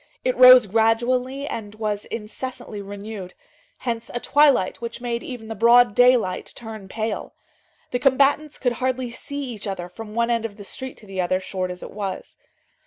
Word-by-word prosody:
It 255 - +1
rose 255 -1 +9
gradually 240 +6 +1
and 215 -6 -6
was 210 -1 -3
incessantly 225 -1 -6
renewed; 200 -2 -8 0.4
hence 230 -2 -4
a 240 - -3
twilight 280 -9 +3
which 235 0 -5
made 240 -1 -3
even 240 -4 -8
the 225 - -4
broad 235 +1 +5
daylight 245 -5 +3
turn 220 -4 -8
pale. 220 +1 -4 0.6
The 245 - 0
combatants 280 +3 +2
could 245 - 0
hardly 255 -1 -1
see 285 +4 -6
each 230 -5 -6
other 185 -3 -4
from 215 +4 -10
one 235 0 +1
end 230 -1 +1
of 215 -2 -6
the 205 - -9
street 260 +6 -7
to 215 - -15
the 190 -2 -3
other, 185 +1 +1
short 185 -1 -4
as 180 0 -7
it - - -8
was. 200 -2 -6
230 Hz, 175 wpm, -23 LUFS, 205-250 Hz, 0.6 s, rose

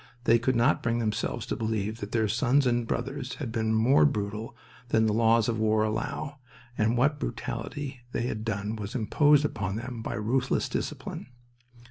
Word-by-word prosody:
They 115 0 +5
could 130 +2 +1
not 120 +6 +3
bring 115 0 0
themselves 110 -3 -2
to - - -2
believe 110 -1 -2
that 100 - -6
their 110 -2 +2
sons 125 +6 +2
and 120 -2 +1
brothers 135 +1 -3
had 130 -7 -5
been 110 -1 0
more 120 +6 +5
brutal 110 -4 -1 0.3
than 110 -1 +3
the 110 - +2
laws 115 0 +4
of 115 -2 -1
war 110 0 +3
allow, 130 +7 -3 0.4
and 115 +2 +1
what 145 +4 +2
brutality 130 +3 -4
they - - -1
had 110 -3 -3
done 105 -1 -2
was 105 +3 -6
imposed 145 +5 +4
upon 100 -8 -2
them 120 +1 -5
by - - -4
ruthless 120 +5 0
discipline. - - -4
115 Hz, 175 wpm, -28 LUFS, 110-130 Hz, 0.4 s, They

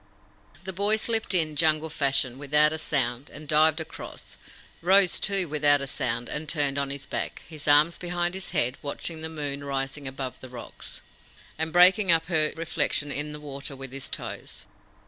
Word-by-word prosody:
The 190 0 -6
boy 200 +4 +2
slipped 225 0 -1
in, 155 -3 +3
Jungle 155 0 +2
fashion, 135 -4 +1
without 150 +2 +4
a 160 - -2
sound, 130 -3 -1
and 150 +1 -11
dived 155 +1 +4
across; 160 - -8 0.5
rose, 190 +1 +5
too, 195 -3 0
without 145 -1 +4
a 140 - -3
sound, 120 -3 -2
and 150 0 -4
turned 145 -3 +1
on 140 -1 -1
his 140 0 -4
back, - - -4
his 155 -2 -9
arms 150 +3 +5
behind 175 0 -2
his 190 -1 -5
head, 140 -6 0
watching 160 +3 -4
the 160 - -4
moon 145 -3 -4
rising 135 0 -3
above 130 -1 -5
the 130 - -10
rocks, 120 -2 -8 0.5
and 160 +1 -2
breaking 185 +2 +6
up 165 -1 +3
her 155 -3 +2
reflection 155 -2 0
in 150 +2 -3
the 150 - -7
water 140 -1 -6
with 135 -1 -8
his 135 0 -5
toes. - - -6
150 Hz, 180 wpm, -26 LUFS, 140-165 Hz, 0.5 s, breaking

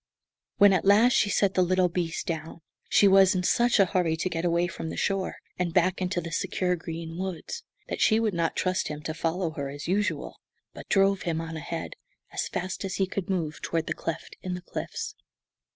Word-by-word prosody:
When, 205 -2 +7
at 185 - +2
last, 215 +6 +6
she 205 - +3
set 200 -1 +2
the 185 - +3
little 185 0 +3
beast 170 -2 -2
down, 160 0 -5 0.3
she 205 - +6
was 195 -1 +6
in 180 - 0
such 240 +4 +3
a 195 - +7
hurry 175 -4 +1
to 185 - -1
get 165 0 -2
away 170 0 +2
from 170 -2 -5
the - - -6
shore 195 -1 0 0.2
and 175 -2 -1
back 185 +1 +3
into 180 -1 0
the 170 -1 -6
secure 180 +2 0
green 165 0 -6
woods 190 - -4 0.3
that - - -4
she 220 0 +5
would 220 -3 +1
not 170 -1 0
trust 185 0 0
him 150 0 -6
to 155 - -3
follow 165 +1 -1
her, 140 -3 -4
as 145 +1 -7
usual, 205 +4 -1 0.3
but - - -11
drove 195 -1 +3
him 165 -2 -1
on 165 0 -5
ahead, 155 - -5 0.4
as - - -2
fast 185 +2 -4
as 195 -1 -3
he 195 - +2
could 190 0 -4
move, 165 -5 -2
toward 165 -1 -1
the - - -2
cleft 165 0 -5
in 180 -1 -3
the 180 - -7
cliffs. - - -5
180 Hz, 215 wpm, -27 LUFS, 165-195 Hz, 0.4 s, When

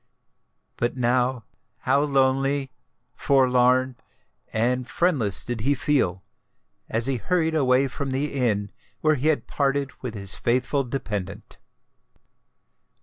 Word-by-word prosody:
But 120 +2 -1
now 125 0 +1 0.4
how 135 +2 +2
lonely, 135 -1 +1 0.4
forlorn, 130 -1 +2 0.5
and 125 +3 0
friendless 130 - +1
did 120 -3 -3
he 140 +5 +2
feel, 110 - 0 0.7
as 115 +1 +1
he 135 -1 +1
hurried 160 +5 0
away 135 -3 +3
from 135 +2 -5
the 135 +3 -2
inn 110 -7 0 0.3
where 155 0 +3
he 145 +1 -1
had 155 -2 +1
parted 140 -1 -1
with 120 -3 -5
his 100 -2 0
faithful 130 +4 0
dependant! 105 -7 -5
130 Hz, 115 wpm, -24 LUFS, 120-140 Hz, 0.7 s, away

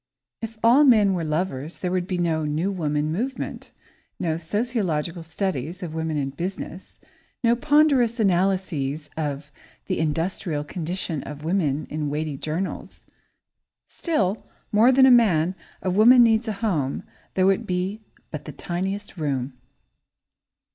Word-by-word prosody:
If 225 0 -6
all 245 +6 +6
men 215 -8 +5
were 175 -3 -1
lovers, 155 -1 -2
there 180 - -1
would 180 -1 -1
be 185 - -2
no 165 -2 0
"new 155 +6 -1
woman" 150 -4 -1
movement, 250 +10 -4 0.5
no 165 -3 0
sociological 175 -3 -2
studies 170 0 -3
of 165 -3 -5
"Woman 160 -1 -2
in 135 -1 -1
Business," 180 +3 -6 0.5
no 235 0 +4
ponderous 280 -4 +3
analyses 180 -7 0
of 145 -2 -4 0.3
"The 185 - -2
Industrial 160 0 -1
Condition 170 -1 -3
of 150 +1 -8
Women" 155 -4 0
in 150 -1 -2
weighty 150 0 -2
journals. 155 +7 -4 0.9
Still 215 - -1 0.3
more 220 +5 +6
than 260 0 +6
a 265 - +7
man, 185 -8 +4 0.3
a 185 - 0
woman 235 +6 +7
needs 225 0 +3
a 220 - -1
home, 150 -10 -1 0.3
though 190 0 +4
it 195 - 0
be 185 +4 -2 0.3
but 150 - -6
the 150 - -6
tiniest 190 +7 -4
room. 140 -4 -2
180 Hz, 140 wpm, -24 LUFS, 155-205 Hz, 0.9 s, a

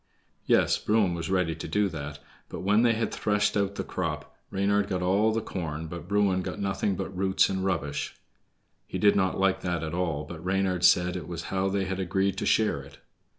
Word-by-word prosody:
Yes, - - +3
Bruin 105 -4 +2
was 85 -2 -4
ready 90 -3 +1
to 80 - -7
do 100 +5 +2
that; 75 -3 -6 0.3
but - - -6
when 105 +4 +3
they 120 -1 +4
had 115 +1 -2
threshed 105 -1 +1
out 100 -1 0
the - - -3
crop, - - -4
Reynard 100 +1 +1
got 90 -1 -2
all 100 +5 +3
the 110 +1 0
corn, 80 -6 -4
but 85 +1 -7
Bruin 100 -2 +2
got 100 - -5
nothing 100 0 0
but 95 0 -5
roots 95 +1 +2
and 95 -1 -2
rubbish. 75 -6 -2 0.7
He - - -4
did 105 -1 +4
not 95 -2 +1
like 95 0 +2
that 85 -2 -2
at 80 0 -4
all, 85 -4 -1
but 80 +2 -9
Reynard 95 -1 0
said 90 0 +5
it 85 -4 -5
was 85 -1 -5
how 95 0 +1
they 100 0 0
had 95 +1 -3
agreed 95 +1 0
to - - -2
share 110 -10 +2
it. 70 - -14
95 Hz, 210 wpm, -27 LUFS, 85-100 Hz, 0.7 s, said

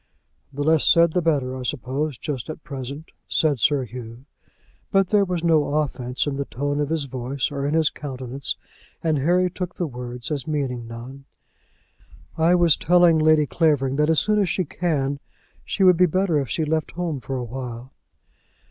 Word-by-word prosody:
"The 145 +1 -3
less 160 +1 +3
said 170 -1 +5
the 180 - +2
better, 140 -6 0
I 130 - -6
suppose, 135 +2 -3
just 140 -5 -5
at 155 - -7
present," 140 +2 -7 0.2
said 150 -5 +2
Sir 145 +2 +3
Hugh. 120 +1 -9 0.6
But 195 -1 +2
there 205 -2 +4
was 180 -2 -3
no 155 -3 +2
offence 130 -4 -1
in 140 -2 -2
the 140 - -2
tone 145 +3 -2
of 145 -1 -1
his 160 -2 0
voice, 130 +1 -3
or 140 -1 -2
in 150 - 0
his 160 -2 +3
countenance, 130 -1 -5 0.5
and 155 -3 +1
Harry 180 +6 +3
took 180 0 -5
the 175 - -2
words 125 -1 -7
as 145 -2 -2
meaning 130 -6 -2
none. 125 +4 -9 1.1
"I 165 +2 +4
was 170 -3 +5
telling 175 -1 +4
Lady 155 -1 +4
Clavering 140 -2 +1
that 150 +1 +2
as 160 - +4
soon 210 0 +1
as 195 -3 +1
she 185 +1 0
can, 145 -4 -1 0.4
she 195 - -1
would 180 -2 +6
be 180 +1 +5
better 180 -2 +1
if 135 -4 -3
she 160 - -1
left 155 +1 -1
home 165 -5 -3
for 130 +3 -4
awhile." 125 0 -6
145 Hz, 185 wpm, -23 LUFS, 130-165 Hz, 1.1 s, would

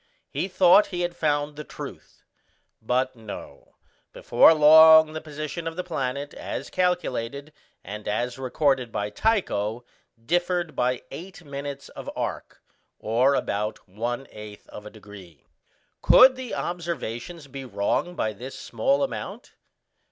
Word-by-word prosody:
He - - -2
thought 185 +1 +5
he 180 -2 -4
had 175 0 -2
found 145 -1 0
the 150 - -7
truth; - - -10 0.6
but 130 +3 0
no, 110 -3 -11 0.4
before - - +5
long 160 0 +8
the 155 - -5
position 155 +2 -6
of 165 - -4
the 180 - -3
planet, 140 -4 -3
as 140 - -6
calculated, 145 -6 -1 0.3
and 105 +2 -8
as 120 +5 -2
recorded 130 -2 0
by 105 0 -3
Tycho, 120 - 0 0.3
differed 175 +4 -1
by 125 0 0
eight 175 +5 -9
minutes 140 0 -6
of - - -8
arc, - - -5 0.3
or 125 +6 +2
about 105 -2 -3
one 120 +7 -4
eighth 105 -1 -11
of 105 0 -10
a - - -7
degree. 100 -8 -14 0.6
Could 260 0 +7
the 255 -2 -6
observation 170 -4 -4
be 135 -1 -7
wrong 120 - -1
by 110 -8 -1
this 125 +6 -9
small 280 +1 0
amount? 275 - -6
140 Hz, 135 wpm, -25 LUFS, 115-170 Hz, 0.6 s, long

